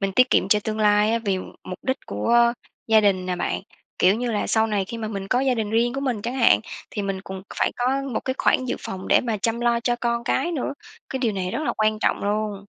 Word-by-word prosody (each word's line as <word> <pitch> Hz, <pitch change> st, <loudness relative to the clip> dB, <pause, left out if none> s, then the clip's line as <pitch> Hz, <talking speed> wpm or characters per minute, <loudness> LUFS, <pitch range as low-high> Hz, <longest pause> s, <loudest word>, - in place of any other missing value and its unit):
mình 195 Hz, -1 st, -1 dB
tiết 255 Hz, +5 st, +4 dB
kiệm -, -, +3 dB
cho 210 Hz, -, +5 dB
tương 220 Hz, 0 st, -2 dB
lai 210 Hz, 0 st, +4 dB
á, 230 Hz, -, +2 dB
vì 195 Hz, -2 st, +1 dB, 0.3 s
mục 185 Hz, -, -6 dB
đích 260 Hz, 0 st, 0 dB
của 235 Hz, -, +3 dB, 0.3 s
gia 220 Hz, -1 st, +5 dB
đình 190 Hz, -3 st, +2 dB
nè 180 Hz, -1 st, -1 dB
bạn. -, -, -2 dB, 0.4 s
Kiểu 185 Hz, +2 st, +5 dB
như 240 Hz, +2 st, -2 dB
là, 210 Hz, -2 st, -1 dB
sau 220 Hz, 0 st, +2 dB
này 205 Hz, -3 st, 0 dB
khi 230 Hz, +5 st, -7 dB
mà 220 Hz, -1 st, -3 dB
mình 195 Hz, -2 st, -5 dB
có 250 Hz, +3 st, +2 dB
gia 265 Hz, -1 st, +2 dB
đình 220 Hz, -3 st, -2 dB
riêng 235 Hz, +2 st, +2 dB
của 275 Hz, -, -2 dB
mình 250 Hz, -7 st, -2 dB
chẳng 240 Hz, +3 st, -3 dB
hạn, 105 Hz, -, +5 dB, 0.3 s
thì 205 Hz, -, -3 dB
mình 195 Hz, -1 st, -3 dB
cùng 190 Hz, -1 st, -8 dB, 0.2 s
phải -, -, +1 dB
có 260 Hz, +3 st, 0 dB
một -, -, -1 dB
cái 260 Hz, -, -1 dB
khoản 255 Hz, -, +2 dB
dự 255 Hz, -, -2 dB
phòng 190 Hz, 0 st, -6 dB
để -, -, +5 dB
mà 230 Hz, -3 st, -2 dB
chăm 225 Hz, +4 st, -1 dB
lo 235 Hz, -1 st, +2 dB
cho 240 Hz, +1 st, 0 dB
con 235 Hz, 0 st, -1 dB
cái 275 Hz, +7 st, 0 dB
nữa, 290 Hz, -6 st, -2 dB, 0.4 s
cái 265 Hz, -, -2 dB
điều 235 Hz, -4 st, 0 dB
này 185 Hz, -2 st, -3 dB
rất 305 Hz, -, -3 dB
là -, -, 0 dB
quan 215 Hz, 0 st, +2 dB
trọng -, -, 0 dB
luôn. 205 Hz, -1 st, -2 dB
220 Hz, 265 wpm, -23 LUFS, 200-240 Hz, 0.4 s, cho